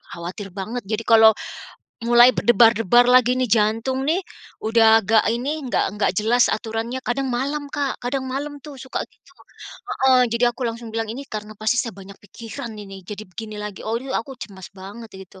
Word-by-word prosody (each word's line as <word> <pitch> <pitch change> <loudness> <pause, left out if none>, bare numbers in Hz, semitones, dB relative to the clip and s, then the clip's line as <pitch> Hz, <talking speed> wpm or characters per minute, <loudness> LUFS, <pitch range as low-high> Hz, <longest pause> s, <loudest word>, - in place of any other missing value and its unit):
khawatir 180 +4 -7
banget. 220 +5 -5
Jadi 220 +1 -2
kalau, 220 -1 +6 0.7
mulai 240 +1 +6
berdebar-debar 235 -1 +5
lagi 250 0 +5
nih 255 -1 +1
jantung 225 +5 +1
nih 340 +4 +2 0.4
udah 225 0 +5
agak 220 +2 +4
ini 265 +7 -2
enggak 250 - 0
enggak 205 0 0
jelas 240 +3 +3
aturannya 225 +3 -3
kadang 265 +2 -1
malam 280 +4 -2
Kak 280 -2 -3
kadang 265 +2 -2
malam 285 +3 -4
tuh 295 -2 -9
suka 260 - -4
gitu, - - -26 0.7
heeh, 260 -1 +5
jadi 235 +1 +3
aku 255 - -7
langsung 230 0 -7
bilang 225 -1 -2
ini 275 +3 -7
karena 215 0 -6
pasti 220 +2 +1
saya 230 - -6
banyak 195 0 -12
pikiran 225 +2 -8
ini 195 -2 -10
jadi 210 +3 -8
begini 215 +3 -8
lagi 210 -2 -7
oh 225 +2 -1
yu 265 +1 -8
aku 230 +4 -4
cemas 190 -4 -10
banget 200 +4 -10
itu. 190 0 -17
230 Hz, 180 wpm, -22 LUFS, 215-255 Hz, 0.7 s, kalau